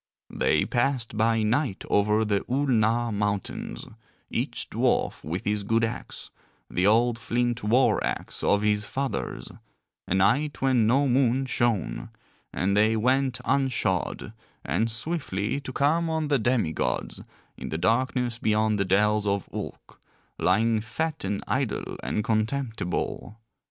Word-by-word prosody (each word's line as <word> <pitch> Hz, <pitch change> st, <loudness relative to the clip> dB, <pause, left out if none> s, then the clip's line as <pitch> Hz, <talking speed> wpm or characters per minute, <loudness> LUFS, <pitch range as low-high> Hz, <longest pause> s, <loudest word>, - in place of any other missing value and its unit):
They -, -, +2 dB
passed 120 Hz, -3 st, 0 dB
by 110 Hz, 0 st, +2 dB
night 115 Hz, -1 st, 0 dB
over 105 Hz, +2 st, +2 dB
the 100 Hz, -2 st, +1 dB
Oolnar 120 Hz, -3 st, +2 dB
Mountains, 105 Hz, -1 st, -3 dB, 0.5 s
each -, -, -2 dB
dwarf -, -, 0 dB
with 85 Hz, +5 st, -4 dB
his 105 Hz, 0 st, 0 dB
good 115 Hz, +3 st, +1 dB
axe, 115 Hz, -, -4 dB, 0.4 s
the 90 Hz, +2 st, +2 dB
old 115 Hz, +2 st, +3 dB
flint 120 Hz, 0 st, -1 dB
war 120 Hz, +5 st, +3 dB
axe -, -, -3 dB
of 100 Hz, +1 st, +3 dB
his 105 Hz, 0 st, +1 dB
fathers, 135 Hz, -, -3 dB, 0.6 s
a 95 Hz, -, 0 dB
night 140 Hz, +10 st, +2 dB
when 130 Hz, -5 st, +3 dB
no 135 Hz, +5 st, +3 dB
moon 130 Hz, 0 st, +2 dB
shone, 120 Hz, -5 st, -1 dB, 0.4 s
and 100 Hz, +2 st, 0 dB
they 110 Hz, +2 st, +3 dB
went 130 Hz, +2 st, +1 dB
unshod, 120 Hz, -7 st, 0 dB, 0.3 s
and 115 Hz, +1 st, 0 dB
swiftly, 110 Hz, -, -2 dB
to 135 Hz, -2 st, -7 dB
come 160 Hz, +5 st, +1 dB
on 160 Hz, -2 st, -1 dB
the 140 Hz, -3 st, +3 dB
demi 115 Hz, -8 st, +1 dB
gods -, -, -2 dB, 0.3 s
in -, -, -7 dB
the 80 Hz, -, -2 dB
darkness 120 Hz, +5 st, 0 dB
beyond 110 Hz, -1 st, +1 dB
the 100 Hz, -, +1 dB
dells 105 Hz, +2 st, +2 dB
of 100 Hz, -1 st, 0 dB
Ulk, -, -, -8 dB, 0.4 s
lying 115 Hz, 0 st, +2 dB
fat 155 Hz, +8 st, -3 dB
and 100 Hz, +1 st, -2 dB
idle 130 Hz, 0 st, -2 dB
and 75 Hz, +12 st, -2 dB
contemptible. 110 Hz, -2 st, -2 dB
115 Hz, 135 wpm, -26 LUFS, 105-130 Hz, 0.6 s, old